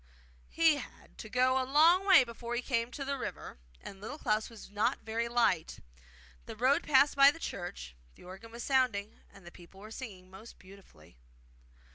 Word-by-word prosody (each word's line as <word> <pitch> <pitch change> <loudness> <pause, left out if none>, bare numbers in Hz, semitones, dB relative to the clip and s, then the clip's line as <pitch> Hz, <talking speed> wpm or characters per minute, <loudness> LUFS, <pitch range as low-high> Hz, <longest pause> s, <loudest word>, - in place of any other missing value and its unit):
He 325 -2 +3
had 270 - -12
to 215 - -9
go 255 +3 +2
a - - -1
long 325 +8 +4
way 370 -9 +7
before 235 0 -7
he 245 - -3
came 235 -3 -1
to 275 +3 -7
the 275 0 -3
river, - - -7 0.2
and 195 -1 -11
Little 240 +8 -7
Klaus 215 -6 -1
was 225 -3 -13
not 210 +1 -1
very 230 +1 -3
light. 230 -9 0 0.7
The - - -8
road 260 +8 +2
passed 285 -1 +3
by 275 0 +8
the 295 - -4
church; 175 - -7 0.2
the - - -18
organ 190 +5 -12
was 235 0 -8
sounding, 245 -7 0
and 200 -3 -17
the 175 - -11
people 175 +3 -16
were 215 +2 -12
singing 190 -7 -10
most 215 +5 -13
beautifully. 185 - -18
235 Hz, 185 wpm, -31 LUFS, 200-270 Hz, 0.7 s, by